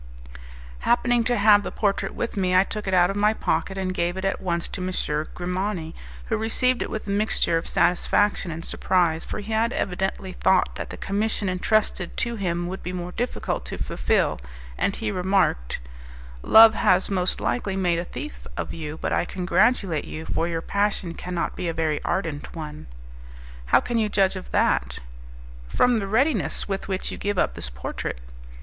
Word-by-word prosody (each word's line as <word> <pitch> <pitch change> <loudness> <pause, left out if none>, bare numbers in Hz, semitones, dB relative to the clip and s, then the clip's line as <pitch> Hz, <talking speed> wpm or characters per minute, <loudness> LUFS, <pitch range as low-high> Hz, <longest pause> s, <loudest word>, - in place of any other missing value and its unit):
Happening 240 0 +2
to 245 0 +2
have 205 0 +6
the - - -4
portrait 195 -2 -1
with 235 - -3
me, 185 -2 +1
I 185 - +7
took 210 0 -5
it 190 - -1
out 175 +1 +5
of - - -5
my 210 +2 +3
pocket, 180 +2 -1
and 185 -1 -1
gave 175 0 -1
it 190 - -3
at 195 - -1
once 170 -2 -1
to 185 - -5
M. 185 0 -2 0.4
Grimani, 180 -2 -3 0.3
who 220 - -1
received 245 +3 +1
it - - -2
with 220 - -4
a 200 - -3
mixture 205 -4 +1
of 165 - -1
satisfaction 180 +3 +2
and 165 +1 -6
surprise 170 -3 +1
for - - -5
he 210 +2 -7
had 225 +2 +2
evidently 190 -1 -2
thought 185 0 +2
that - - -5
the - - -7
commission 205 0 -1
entrusted 185 0 0
to 235 -1 -1
him 175 -4 -1
would 185 +2 -5
be 180 - -5
more 180 -1 -5
difficult 245 +6 -2
to - - -5
fulfil, - - 0 0.3
and 195 - 0
he 220 -2 -2
remarked, 180 - +1 0.6
"Love 220 - +8
has 190 -2 +2
most 185 -2 0
likely 200 -5 -1
made 175 -3 +1
a - - -2
thief 300 +11 -8
of - - -3
you 155 -1 -6
but - - -2
I - - +2
congratulate 180 - +1
you, 160 +1 -7
for 165 - -1
your 165 -1 -2
passion 200 -4 0
cannot 180 0 -3
be 180 - -3
a - - -2
very 155 -2 0
ardent 165 -6 -3
one." 155 -2 -7 0.8
"How - - +6
can 240 -1 -1
you 215 -1 +1
judge 195 -1 +2
of 185 - -7
that?" 60 0 +1 0.7
"From 235 - +3
the 195 - -3
readiness 220 - +1
with 195 -1 -3
which 190 -1 -2
you - - -7
give 205 -1 -1
up - - +2
this 60 - -6
portrait." 60 0 -5
190 Hz, 190 wpm, -24 LUFS, 170-210 Hz, 0.8 s, Love